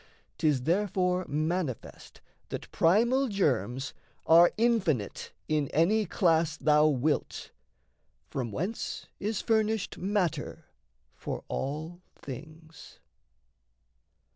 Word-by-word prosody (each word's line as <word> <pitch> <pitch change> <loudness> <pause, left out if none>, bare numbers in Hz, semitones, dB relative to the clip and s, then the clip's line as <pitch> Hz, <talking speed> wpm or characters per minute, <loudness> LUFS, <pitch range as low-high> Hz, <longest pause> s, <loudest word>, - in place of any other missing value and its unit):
'Tis 145 -5 +2
therefore 180 +1 +1
manifest 155 -2 -3 0.3
that - - -6
primal 235 +10 +3
germs, 135 - 0 0.3
Are 170 +2 +7
infinite 200 - 0 0.2
in 150 -2 +1
any 195 +9 +2
class 165 -3 +2
thou 150 0 +4
wilt 145 +1 -1 0.8
From 125 -4 -3
whence 185 - -4
is 210 0 -2
furnished 220 -2 0
matter 190 -3 -1 0.5
for - - -6
all 160 +6 -4
things. 155 +4 -11
165 Hz, 90 wpm, -29 LUFS, 150-200 Hz, 0.8 s, Are